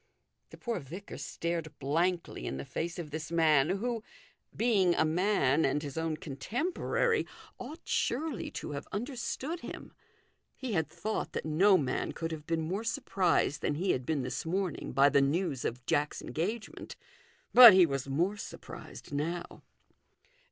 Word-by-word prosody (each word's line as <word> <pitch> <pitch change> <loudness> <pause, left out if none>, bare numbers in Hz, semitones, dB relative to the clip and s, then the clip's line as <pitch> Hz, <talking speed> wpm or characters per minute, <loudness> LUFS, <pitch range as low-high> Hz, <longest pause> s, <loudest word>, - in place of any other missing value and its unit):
The - - -12
poor 235 -2 -3
vicar 175 +9 -9
stared 165 -3 -4
blankly 165 +6 -1
in 65 - -3
the 70 - -5
face 165 +1 -4
of 165 -4 -6
this 155 +1 -5
man, 155 -3 +4
who, 225 +4 -1 0.6
being 200 -7 +3
a - - +3
man 160 -4 +2
and 145 +3 +1
his 140 -2 -6
own 160 -1 -1
con 140 -4 -8
temporary, 345 - 0 0.3
ought 290 +7 -8
surely 280 -1 -1
to - - -6
have 140 -1 -5
understood 260 - -3
300 - - -19
THE - - -8
GOLDEN - - -6
RULE. - - -30
him. - - -34 0.6
He 255 -4 -4
had 160 -4 +1
thought 215 +1 -4
that - - -3
no 185 +6 +5
man 130 -5 -1
could 165 0 -4
have 155 -2 -7
heen 165 -1 0
more 185 +7 -2
surprised 195 - +1
than 145 - 0
he 180 +5 +1
had 130 - -1
been 150 -4 0
this 125 - -3
morning 180 0 -2
by 135 +2 +5
the 140 - +4
news 140 -1 0
of 120 +1 -4
Jack's 150 +3 0
engagement. 215 +8 -4 0.6
But 240 -5 +12
he 185 -2 +8
was 135 -3 -3
more 175 +9 +1
surprised 175 - -9
now. 170 +4 -3
170 Hz, 175 wpm, -31 LUFS, 150-205 Hz, 0.6 s, But